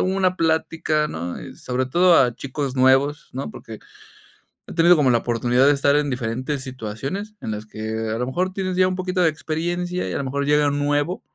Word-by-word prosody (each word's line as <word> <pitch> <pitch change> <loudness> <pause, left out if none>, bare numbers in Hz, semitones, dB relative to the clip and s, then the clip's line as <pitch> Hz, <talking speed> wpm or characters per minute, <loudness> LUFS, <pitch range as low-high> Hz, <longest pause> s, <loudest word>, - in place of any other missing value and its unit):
una 190 -1 +1
plática, 160 -2 0
¿no?, 85 +2 -5
y - - -9
sobre 130 0 -2
todo 175 +5 +4
a 125 -3 +3
chicos 140 -1 -4
nuevos, 135 +3 +3
¿no?, 135 +2 -5
porque 110 -1 -10 0.9
he - - -8
tenido 170 +1 +6
como 135 -4 +3
la 120 - +4
oportunidad 120 +3 +2
de 145 - +6
estar 140 0 +2
en 150 -1 0
diferentes 130 +3 -3
situaciones 130 - -6
en - - -4
las 105 0 -5
que 110 0 -6 0.2
a - - -2
lo 125 - -1
mejor 180 +8 -1
tienes 185 -1 -3
ya 185 0 +5
un 185 - -2
poquito 185 0 -2
de 175 - +5
experiencia 175 +3 -3
y - - -4
a - - -1
lo - - -2
mejor 140 +2 -2
llega 150 0 +3
un 145 0 -2
nuevo, 145 +5 0
145 Hz, 210 wpm, -22 LUFS, 130-175 Hz, 0.9 s, tenido